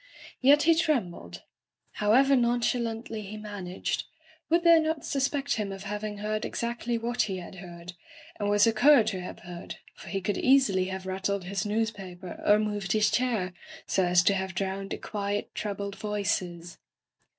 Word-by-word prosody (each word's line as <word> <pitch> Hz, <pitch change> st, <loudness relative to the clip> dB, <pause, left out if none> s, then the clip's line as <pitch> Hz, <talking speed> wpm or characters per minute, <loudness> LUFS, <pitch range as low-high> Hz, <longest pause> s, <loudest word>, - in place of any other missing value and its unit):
Yet 285 Hz, +3 st, +6 dB
he 330 Hz, +2 st, +6 dB
trem 300 Hz, -, +1 dB
bled. 85 Hz, -, -11 dB, 0.6 s
However 260 Hz, +7 st, +5 dB
nonchalandy 235 Hz, -2 st, 0 dB
he 210 Hz, +1 st, -7 dB
managed, 205 Hz, -4 st, -4 dB, 0.4 s
would 340 Hz, +1 st, +3 dB
they 335 Hz, -1 st, +7 dB
not 315 Hz, -1 st, -1 dB
suspect 280 Hz, 0 st, 0 dB
him 205 Hz, -2 st, -2 dB
of 195 Hz, 0 st, -7 dB
having 210 Hz, +1 st, -4 dB
heard 215 Hz, +1 st, -2 dB
exacdy 235 Hz, 0 st, -2 dB
what 240 Hz, +2 st, -1 dB
he 190 Hz, -, -2 dB
had 180 Hz, +1 st, -9 dB
heard 175 Hz, -1 st, -9 dB, 0.2 s
— -, -, -19 dB
^and 205 Hz, -, 0 dB
was 205 Hz, 0 st, +5 dB
a 225 Hz, -, +3 dB
cur 275 Hz, +3 st, +6 dB
to 205 Hz, -4 st, -3 dB
have 180 Hz, -, -8 dB
heard, 175 Hz, -1 st, -8 dB, 0.2 s
for -, -, -13 dB
he 195 Hz, -, -1 dB
could 195 Hz, +1 st, -2 dB
easily 255 Hz, -9 st, +4 dB
have 190 Hz, 0 st, -5 dB
rattled 190 Hz, +1 st, -2 dB
his 195 Hz, +3 st, -3 dB
newspaper 200 Hz, -5 st, -4 dB
or 210 Hz, -, +5 dB
moved 205 Hz, -3 st, -1 dB
his 215 Hz, -1 st, +3 dB
chair 225 Hz, -8 st, 0 dB, 0.3 s
so 190 Hz, -, +1 dB
as 175 Hz, 0 st, +4 dB
to 200 Hz, -, +4 dB
have 190 Hz, -1 st, -3 dB
drowned 195 Hz, 0 st, -3 dB
the -, -, -3 dB
quiet, 205 Hz, -1 st, -3 dB
troubled 200 Hz, -1 st, -4 dB
voices 180 Hz, -5 st, -3 dB
205 Hz, 175 wpm, -28 LUFS, 190-235 Hz, 0.6 s, they